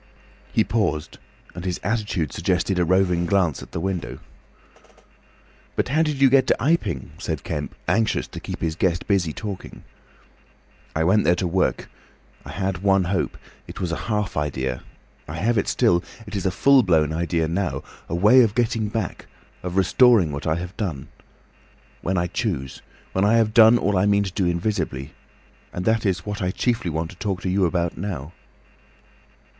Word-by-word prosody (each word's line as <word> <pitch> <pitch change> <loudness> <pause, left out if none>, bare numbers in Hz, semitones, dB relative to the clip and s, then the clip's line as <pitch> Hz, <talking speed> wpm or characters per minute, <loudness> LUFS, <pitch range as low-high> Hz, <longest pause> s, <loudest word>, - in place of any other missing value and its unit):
He - - +3
paused, 80 -10 -1 0.3
and 85 - -7
his 90 -2 -2
attitude 105 -8 -1
suggested 95 -2 0
a - - +3
roving 90 -1 +2
glance 90 -7 +1
at - - -11
the - - -3
window. 95 0 -3 1.6
"But - - 0
how 155 +5 +2
did 150 -3 0
you 135 - +7
get 130 -1 +4
to - - +3
Iping?" 135 - 0
said - - -4
Kemp, - - -4
anxious 110 0 +1
to - - -7
keep - - -7
his 80 -1 -1
guest 85 -1 0
busy 95 -6 +1
talking. 100 +3 -7 1.1
"I 80 - +1
went 100 +5 +3
there 85 - +4
to 90 - -2
work. 90 +1 0 0.6
I - - -11
had 95 +2 -2
one 95 0 +3
hope. 90 +1 -1 0.3
It - - -9
was 90 -2 -2
a - - 0
half 105 -3 -1
idea! 65 -4 -2 0.5
I 80 - -6
have 110 +7 +1
it - - -2
still. 85 +1 +2 0.2
It 105 -1 -7
is 95 -1 -1
a - - +3
full 135 +7 +5
blown 80 -7 +2
idea 85 0 0
now. 90 +2 -2 0.3
A 85 - -1
way 105 +9 +6
of 110 -3 +2
getting 115 -2 +1
back! 105 -4 -4 0.3
Of 90 +1 -4
restoring 95 - +5
what 70 +2 -5
I 80 - +2
have 90 +3 -6
done. 85 -11 -4 0.9
When 95 +1 -1
I 85 - +1
choose. 90 - -3 0.3
When 95 - +1
I 105 +3 +4
have 110 -2 +2
done 115 +1 +7
all 100 -4 +1
I 100 - +3
mean 100 0 +3
to 95 - -4
do 95 -1 0
invisibly. 85 -6 -2 0.6
And 90 - -5
that 110 -1 +2
is 95 -2 -1
what 105 -1 -4
I 90 - 0
chiefly 115 -1 -1
want 80 +1 -3
to 90 - -15
talk 95 -1 -3
to 95 - -1
you 95 0 +2
about 85 -1 -2
now." 85 -5 -5
95 Hz, 180 wpm, -23 LUFS, 85-105 Hz, 1.6 s, you